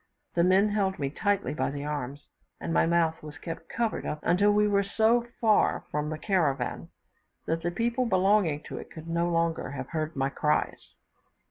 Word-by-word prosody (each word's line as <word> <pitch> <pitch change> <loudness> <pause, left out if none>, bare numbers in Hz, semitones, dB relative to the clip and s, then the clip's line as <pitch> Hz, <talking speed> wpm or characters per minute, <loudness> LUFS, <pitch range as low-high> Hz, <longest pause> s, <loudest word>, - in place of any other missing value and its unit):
The 170 - +3
men 190 +3 +4
held 195 -2 0
me 140 -3 -2
tightly 200 +2 0
by - - -1
the 140 +1 -5
arms, 145 -1 -4 0.3
and 165 - -3
my - - +3
mouth 165 -1 +1
was 150 -2 -9
kept 165 +1 -7
covered 230 -2 -1
up - - -3
until 200 +4 +4
we 210 0 +3
were 200 -1 +3
so 225 +4 +2
far 220 -2 +3
from 150 0 -1
the 155 - -3
caravan 160 -7 0 0.6
that 165 +1 -1
the 175 - -1
people 235 +7 0
belonging 190 -6 +2
to - - -7
it - - -10
could 160 0 -10
no 170 +1 0
longer 165 -1 0
have 130 -2 -6
heard 155 -1 -3
my 135 0 0
cries. 150 +2 -1
170 Hz, 190 wpm, -28 LUFS, 150-205 Hz, 0.6 s, men